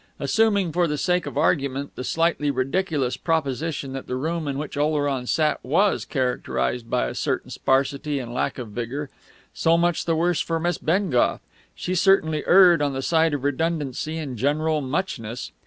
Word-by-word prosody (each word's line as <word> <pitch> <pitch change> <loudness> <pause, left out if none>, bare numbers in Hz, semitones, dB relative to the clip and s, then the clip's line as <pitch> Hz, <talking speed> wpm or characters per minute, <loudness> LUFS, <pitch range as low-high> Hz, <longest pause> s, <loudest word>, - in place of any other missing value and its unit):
Assuming 205 -6 +2
for 175 +1 +2
the 150 -1 -2
sake 180 +3 0
of - - -6
argument 140 -2 0
the - - -5
slightly 165 0 +1
ridiculous 135 0 -1
proposition 150 -3 -2
that 135 - -6
the 125 - -2
room 160 +4 -2
in 140 -1 -2
which 150 +1 -5
Oleron 145 -3 0
sat 155 +2 +1
was 190 +10 +2
characterised 125 -3 -2
by - - +1
a - - -4
certain - - -2
sparsity 140 +2 0
and 120 -3 -5
lack 125 - -1
of 120 -4 -6
vigour; 120 +6 -5 0.4
so 165 +1 +3
much 175 -1 +1
the 165 - +1
worse 170 +1 +1
for 165 -1 -1
Miss 175 0 -1
Bengough; 165 -6 +1 0.4
she 180 - -3
certainly 175 -4 +3
erred 175 -4 +7
on 145 -1 0
the 135 0 -3
side 160 0 +2
of 140 - -5
redundancy 150 +1 -1
and 140 -6 -5
general 150 +5 +1
muchness. 130 - -3
150 Hz, 170 wpm, -24 LUFS, 135-165 Hz, 0.4 s, erred